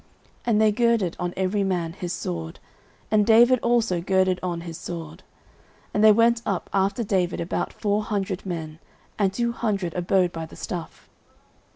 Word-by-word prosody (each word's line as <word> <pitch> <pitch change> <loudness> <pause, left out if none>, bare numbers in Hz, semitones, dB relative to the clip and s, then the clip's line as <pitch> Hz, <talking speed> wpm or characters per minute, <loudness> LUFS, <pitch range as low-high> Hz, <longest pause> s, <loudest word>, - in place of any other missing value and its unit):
And 220 -3 +3
they 215 -1 +5
girded 230 -5 +1
on 175 0 -2
every 190 +2 0
man 175 -4 -1
his 180 -2 -5
sword; 85 - -5 0.5
and 215 -1 +4
David 235 +4 +6
also 230 -7 +1
girded 185 0 +2
on 175 -2 -3
his 170 -1 -7
sword: 165 0 -7 0.7
and 210 - +2
there 215 - +9
went 230 +2 +4
up 195 -5 -3
after 195 +4 +1
David 185 -4 0
about 170 - -2
four 205 0 0
hundred 195 -2 -2
men; 160 -4 -5 0.4
and 195 -2 +3
two 235 +4 -1
hundred 200 -7 -2
abode 180 0 +1
by 165 -1 -6
the - - -14
stuff. 175 -2 -7
190 Hz, 165 wpm, -24 LUFS, 175-215 Hz, 0.7 s, there